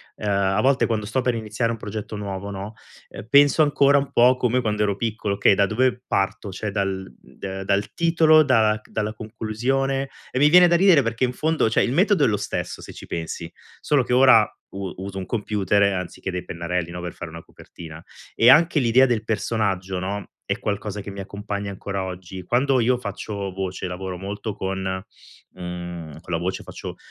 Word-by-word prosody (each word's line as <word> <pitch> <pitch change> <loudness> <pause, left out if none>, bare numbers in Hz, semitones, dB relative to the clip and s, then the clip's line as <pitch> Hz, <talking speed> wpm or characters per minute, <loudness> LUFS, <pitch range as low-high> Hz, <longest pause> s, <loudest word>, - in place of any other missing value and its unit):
Ehm, 105 - -5
a 100 +1 +2
volte 135 0 +3
quando 110 -3 -2
sto 130 +4 0
per 125 0 +1
iniziare 115 +1 -2
un 115 - -4
progetto 105 0 -6
nuovo, 100 -1 -5
no, 100 +2 -6 0.6
penso 145 +2 +6
ancora 145 -1 +4
un 140 0 -1
po' 125 +1 +5
come 125 +1 +1
quando 105 -1 0
ero 100 -2 0
piccolo: 110 -2 -2
"Okay, 100 - +4
da 100 - +3
dove 125 +4 0
parto?" 95 +1 -1
Cioè 100 +3 -4
dal, 95 -6 -2 0.3
ehm, 95 0 -5
dal 100 +1 0
titolo, 165 -2 +5
dalla 110 -6 +3
dalla 110 0 -3
conclusione? 125 +5 -2 0.2
E - - -4
mi 145 +2 +6
viene 180 +2 +8
da 170 - +3
ridere 175 -4 +6
perché 115 +1 -2
in 125 0 +1
fondo, 160 -1 +1
cioè, - - +2
il 120 - 0
metodo 185 -1 +3
è - - +4
lo 105 -2 +1
stesso, - - -4
se - - -10
ci - - -11
pensi. 85 0 -5 0.3
Solo 145 -3 +2
che 125 - -2
ora 125 -4 +6 0.3
u 95 -2 -5
uso 95 +1 -6
un 95 - -4
computer, 105 -1 0
anziché 90 +1 -5
dei 90 0 -4
pennarelli, 85 0 -3
no, 90 0 -6
per 90 -1 -5
fare 85 - -8
una 85 +1 -9
copertina. 80 -1 -12 0.3
E 120 - +6
anche 160 +2 +5
l'idea 125 +1 +5
del 115 -3 0
personaggio, 100 -4 -1
no, 100 +2 -5
è - - -2
qualcosa 105 0 -3
che 100 - -8
mi 100 - -8
accompagna 100 0 -5
ancora 100 0 -4
oggi. 95 0 -7
Quando 130 +7 +2
io 125 +2 +2
faccio 100 -3 -5
voce, 95 -1 -4
lavoro 90 0 -5
molto 100 +3 -5
con, 95 0 -3 0.7
mhmm, 85 -3 -7
con 90 - -7
la - - +2
voce, 90 +2 -3
faccio - - -8
105 Hz, 195 wpm, -23 LUFS, 95-125 Hz, 0.7 s, viene